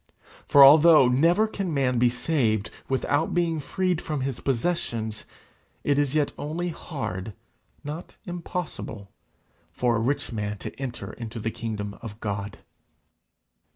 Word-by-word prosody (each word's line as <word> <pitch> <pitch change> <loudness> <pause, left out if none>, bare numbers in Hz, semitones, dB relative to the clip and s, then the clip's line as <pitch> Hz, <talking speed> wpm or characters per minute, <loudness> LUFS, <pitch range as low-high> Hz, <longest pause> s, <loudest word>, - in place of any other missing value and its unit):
For, 140 - +8
although 150 0 +8
never 165 - +4
can 195 -4 -3
man 125 -3 +1
be 120 0 +5
saved 120 -5 0 0.2
without 145 +4 0
being 170 -2 +1
freed 180 +3 -1
from 150 -3 -3
his 130 -2 -3
possessions, 115 -6 -2 0.6
it 145 0 +2
is 145 0 0
yet 150 -2 +1
only 170 +4 -3
hard, 110 - -5 0.5
not 150 +4 -7
impossible, 170 - -5 0.6
for 120 +6 +1
a - - +1
rich 140 +5 -1
man 105 -2 -3
to - - -7
enter 130 -3 -5
into 115 -1 -7
the 115 +1 -2
kingdom 105 -3 -5
of 110 -2 -8
God. 100 -2 -4
135 Hz, 135 wpm, -26 LUFS, 110-160 Hz, 0.6 s, For